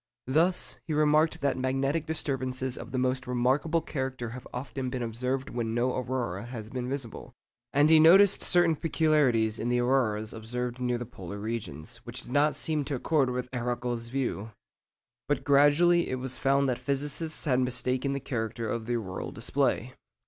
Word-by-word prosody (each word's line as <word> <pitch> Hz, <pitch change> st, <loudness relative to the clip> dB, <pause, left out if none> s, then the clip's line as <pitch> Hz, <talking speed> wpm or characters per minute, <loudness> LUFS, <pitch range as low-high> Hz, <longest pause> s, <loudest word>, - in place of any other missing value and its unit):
Thus, 165 Hz, +7 st, +1 dB
he 155 Hz, -, -1 dB
remarked 155 Hz, +1 st, +3 dB
that 140 Hz, -2 st, 0 dB
magnetic 135 Hz, +4 st, 0 dB
disturbances 130 Hz, -4 st, -1 dB
of -, -, -8 dB
the 130 Hz, -, -2 dB
most 130 Hz, +1 st, 0 dB
remarkable 130 Hz, +7 st, +1 dB
character 130 Hz, -5 st, -4 dB
have 125 Hz, +2 st, -9 dB
often 130 Hz, +1 st, -4 dB
been 125 Hz, -1 st, -3 dB
observed 125 Hz, +4 st, -2 dB
when 115 Hz, -2 st, -2 dB
no 125 Hz, +1 st, +1 dB
aurora 120 Hz, -6 st, -3 dB
has 115 Hz, -3 st, -7 dB
been 125 Hz, -1 st, -3 dB
visible; 130 Hz, -4 st, -6 dB, 0.4 s
and 145 Hz, +2 st, +4 dB
he 160 Hz, 0 st, +7 dB
noticed 190 Hz, +5 st, +7 dB
certain 175 Hz, -2 st, +4 dB
peculiarities 145 Hz, -9 st, +2 dB
in 120 Hz, -, -1 dB
the 125 Hz, -, +2 dB
auroras 115 Hz, -4 st, +1 dB
observed 120 Hz, +2 st, -4 dB
near 125 Hz, -1 st, 0 dB
the 120 Hz, -, -5 dB
polar 100 Hz, -4 st, -8 dB
regions, 100 Hz, -8 st, -5 dB
which -, -, -7 dB
did -, -, -11 dB
not 145 Hz, +2 st, +3 dB
seem 155 Hz, -2 st, -1 dB
to 140 Hz, -, -2 dB
accord 140 Hz, 0 st, +1 dB
with 125 Hz, 0 st, -3 dB
Arago's 120 Hz, -1 st, -2 dB
view. 120 Hz, -4 st, -2 dB, 0.8 s
But 140 Hz, -1 st, 0 dB
gradually 145 Hz, +5 st, +4 dB
it 130 Hz, -, -1 dB
was 130 Hz, 0 st, -4 dB
found 140 Hz, 0 st, +2 dB
that 125 Hz, -2 st, -1 dB
physicists 145 Hz, +5 st, -3 dB
had 130 Hz, -4 st, +2 dB
mistaken 125 Hz, +2 st, 0 dB
the 140 Hz, -, -2 dB
character 115 Hz, -3 st, -3 dB
of 110 Hz, +1 st, -3 dB
the 120 Hz, -, 0 dB
auroral 95 Hz, -5 st, -4 dB
display. -, -, -1 dB
130 Hz, 170 wpm, -28 LUFS, 120-145 Hz, 0.8 s, he